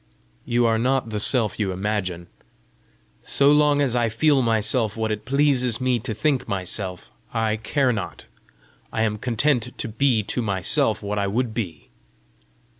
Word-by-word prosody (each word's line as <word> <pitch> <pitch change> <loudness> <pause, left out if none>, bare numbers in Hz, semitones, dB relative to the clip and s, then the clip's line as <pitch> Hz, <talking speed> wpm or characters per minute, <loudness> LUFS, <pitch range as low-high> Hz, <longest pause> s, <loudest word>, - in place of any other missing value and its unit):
"You 120 0 +1
are 115 -1 +2
not 125 -1 0
the 105 - -2
Self 115 0 +2
you 100 -3 0
imagine." 95 -2 -3 1.0
"So 140 +1 +3
long 150 -1 +4
as 130 -4 +1
I 120 -1 +2
feel 140 +5 +2
myself 110 -1 +1
what 110 -1 -1
it 105 0 -4
pleases 130 -3 +2
me 130 -2 +1
to 115 -1 -5
think 135 +3 0
myself, 95 -1 -4 0.2
I 110 -1 +1
care 130 +4 +1
not. 100 -4 -6 0.7
I 110 - 0
am 105 -1 -1
content 125 +1 0
to - - -3
be 115 0 +1
to 125 - -2
myself 100 -3 +1
what 105 +1 -2
I 100 - 0
would 115 +3 -1
be. 90 -10 -5
115 Hz, 160 wpm, -23 LUFS, 105-130 Hz, 1.0 s, long